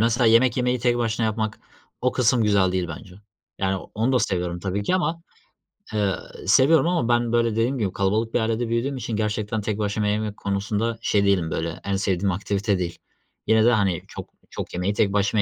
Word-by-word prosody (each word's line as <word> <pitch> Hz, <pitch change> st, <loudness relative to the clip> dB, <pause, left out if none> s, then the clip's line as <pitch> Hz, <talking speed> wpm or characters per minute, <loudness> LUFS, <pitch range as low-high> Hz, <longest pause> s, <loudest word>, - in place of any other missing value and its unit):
mesela 115 Hz, +1 st, +3 dB
yemek 115 Hz, +3 st, +4 dB
yemeyi 125 Hz, 0 st, +1 dB
tek 120 Hz, 0 st, +1 dB
başına 115 Hz, -1 st, 0 dB
yapmak; 110 Hz, 0 st, -2 dB, 0.4 s
o 125 Hz, -, +1 dB
kısım 125 Hz, -1 st, +2 dB
güzel 100 Hz, -3 st, +3 dB
değil 90 Hz, -2 st, -1 dB
bence. 90 Hz, +3 st, -9 dB, 0.4 s
Yani, 95 Hz, 0 st, 0 dB, 0.2 s
onu 115 Hz, +5 st, +1 dB
da 125 Hz, -, +4 dB
seviyorum 90 Hz, -5 st, -1 dB
tabii 100 Hz, +1 st, -2 dB
ki 100 Hz, -, 0 dB
ama, 170 Hz, -2 st, -1 dB, 0.7 s
eee, 100 Hz, -3 st, +1 dB, 0.3 s
seviyorum 160 Hz, +5 st, +5 dB
ama 170 Hz, -10 st, 0 dB
ben 120 Hz, -1 st, +2 dB
böyle 115 Hz, -1 st, +2 dB
dediğim 115 Hz, +5 st, 0 dB
gibi 105 Hz, -6 st, -1 dB
kalabalık 105 Hz, +4 st, 0 dB
bir -, -, +2 dB
ailede 115 Hz, +1 st, -1 dB
büyüdüğüm 125 Hz, +4 st, -1 dB
için 115 Hz, -2 st, -4 dB
gerçekten 105 Hz, 0 st, -2 dB
tek 105 Hz, 0 st, -2 dB
başıma 105 Hz, 0 st, -1 dB
yemek 105 Hz, 0 st, -1 dB
konusunda 105 Hz, +3 st, -2 dB
şey 100 Hz, -1 st, +2 dB
değilim, 90 Hz, -5 st, +2 dB
böyle, 85 Hz, +1 st, -3 dB
en 100 Hz, 0 st, -1 dB
sevdiğim 95 Hz, 0 st, 0 dB
aktivite 100 Hz, +1 st, -1 dB
değil. 85 Hz, -1 st, -3 dB, 0.5 s
Yine 110 Hz, 0 st, +4 dB
de, 120 Hz, -, +6 dB
hani, 100 Hz, -7 st, +1 dB
çok -, -, -9 dB, 0.2 s
çok -, -, -7 dB
yemeyi 90 Hz, +3 st, -1 dB
tek 100 Hz, -1 st, +1 dB
başıma 100 Hz, +1 st, +2 dB
110 Hz, 195 wpm, -23 LUFS, 100-115 Hz, 0.7 s, de